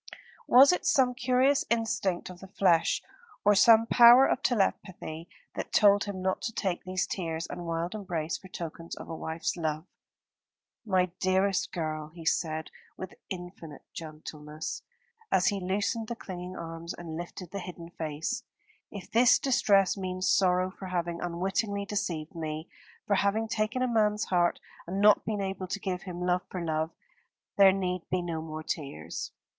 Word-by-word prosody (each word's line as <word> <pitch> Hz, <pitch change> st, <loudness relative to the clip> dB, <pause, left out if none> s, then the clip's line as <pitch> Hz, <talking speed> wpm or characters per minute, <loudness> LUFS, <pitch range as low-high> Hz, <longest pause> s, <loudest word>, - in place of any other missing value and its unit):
Was 270 Hz, +7 st, +8 dB
it 360 Hz, -, -2 dB
some 270 Hz, -8 st, +3 dB
curious 255 Hz, +2 st, +2 dB
instinct 225 Hz, -6 st, 0 dB
of 180 Hz, -, -12 dB
the 195 Hz, -, -11 dB
flesh, 180 Hz, -3 st, +2 dB, 0.4 s
or 205 Hz, -, +7 dB
some 225 Hz, +2 st, +6 dB
power 240 Hz, +3 st, +8 dB
of 265 Hz, -, 0 dB
telepathy, 185 Hz, -, -1 dB, 0.2 s
that -, -, -5 dB
told 205 Hz, -1 st, +5 dB
him 195 Hz, -2 st, -5 dB
not 190 Hz, 0 st, 0 dB
to 230 Hz, -, -2 dB
take 190 Hz, -5 st, -2 dB
these 185 Hz, 0 st, -1 dB
tears 165 Hz, -3 st, -3 dB
and 175 Hz, -1 st, -7 dB
wild 165 Hz, +2 st, -2 dB
embrace 175 Hz, -7 st, -3 dB
for 190 Hz, -, -9 dB
tokens 170 Hz, -2 st, -7 dB
of -, -, -10 dB
a 165 Hz, -, -4 dB
wife's 160 Hz, +1 st, -3 dB
love? 160 Hz, -1 st, -2 dB, 1.0 s
"My 185 Hz, -3 st, +2 dB
dearest 190 Hz, +1 st, +1 dB
girl," 155 Hz, -3 st, -3 dB
he 165 Hz, +1 st, -12 dB
said 160 Hz, -1 st, -1 dB, 0.3 s
with 185 Hz, -, -7 dB, 0.2 s
infinite 175 Hz, -4 st, -8 dB
gentleness, 155 Hz, -1 st, -7 dB, 0.5 s
as -, -, +4 dB
he 200 Hz, -2 st, -2 dB
loosened 205 Hz, +4 st, -1 dB
the 235 Hz, -, -4 dB
clinging 185 Hz, -4 st, -7 dB
arms 165 Hz, 0 st, -6 dB
and 165 Hz, -2 st, -7 dB
lifted 175 Hz, +1 st, -7 dB
the 200 Hz, -, -4 dB
hidden 170 Hz, -2 st, -9 dB
face, 160 Hz, +9 st, -3 dB, 0.5 s
"if 200 Hz, -3 st, -9 dB
this 240 Hz, +2 st, +6 dB
distress 200 Hz, -8 st, +3 dB
means 185 Hz, -1 st, -2 dB
sorrow 185 Hz, -1 st, +3 dB
for 190 Hz, -, -9 dB
having 175 Hz, -2 st, -2 dB
unwittingly 195 Hz, +4 st, -1 dB
deceived 180 Hz, -7 st, -3 dB
me, 155 Hz, -1 st, -5 dB, 0.4 s
for 200 Hz, -, +2 dB
having 210 Hz, +3 st, +1 dB
taken 220 Hz, +3 st, -1 dB
a -, -, +2 dB
man's 210 Hz, -3 st, +2 dB
heart 175 Hz, -2 st, +1 dB, 0.3 s
and 190 Hz, +3 st, -3 dB
not 210 Hz, 0 st, +5 dB
been 215 Hz, -2 st, -2 dB
able 190 Hz, -1 st, -3 dB
to 195 Hz, +2 st, -3 dB
give 185 Hz, -1 st, -3 dB
him 180 Hz, -2 st, -7 dB
love 180 Hz, 0 st, +2 dB
for 185 Hz, -, -5 dB
love, 160 Hz, -1 st, -1 dB, 0.7 s
there 195 Hz, -1 st, +7 dB
need 185 Hz, -2 st, -1 dB
be 180 Hz, -1 st, 0 dB
no 165 Hz, -2 st, -3 dB
more 155 Hz, 0 st, -6 dB
tears. 85 Hz, -, -5 dB
185 Hz, 165 wpm, -29 LUFS, 165-205 Hz, 1.0 s, Was